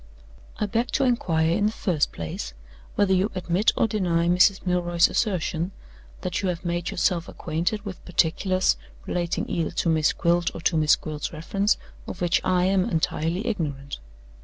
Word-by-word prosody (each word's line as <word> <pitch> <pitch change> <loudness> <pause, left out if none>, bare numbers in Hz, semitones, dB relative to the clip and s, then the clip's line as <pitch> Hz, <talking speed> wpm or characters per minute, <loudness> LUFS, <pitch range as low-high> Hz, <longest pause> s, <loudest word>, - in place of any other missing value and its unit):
"I 210 - 0
beg 230 +4 0
to - - +2
inquire, 165 -11 +2
in 205 +4 +2
the - - 0
first 175 -8 0
place, 70 -6 -5 0.4
whether 200 -2 +3
you 190 +3 +2
admit 185 +3 +2
or - - +4
deny 175 -6 +1
Mrs. 185 +3 +4
Milroy's 175 -1 +3
assertion 180 -4 -1 0.5
that 180 +1 -2
you 190 - 0
have 175 0 -4
made 175 0 -1
yourself 175 -1 0
acquainted 175 +7 -2
with 195 -3 -7
particulars 185 +2 +1 0.3
relating 175 -1 -2
either 165 -2 -1
to - - -1
Miss 155 -2 +3
Gwilt 170 0 +1
or - - -6
to 165 - +1
Miss 155 -1 +5
Gwilt's 150 -1 -5
reference, 195 +6 0 0.3
of - - -6
which 175 -1 +2
I 180 -1 +2
am 190 0 +2
entirely 165 +4 -1
ignorant? 145 - -3
175 Hz, 165 wpm, -25 LUFS, 165-195 Hz, 0.5 s, Miss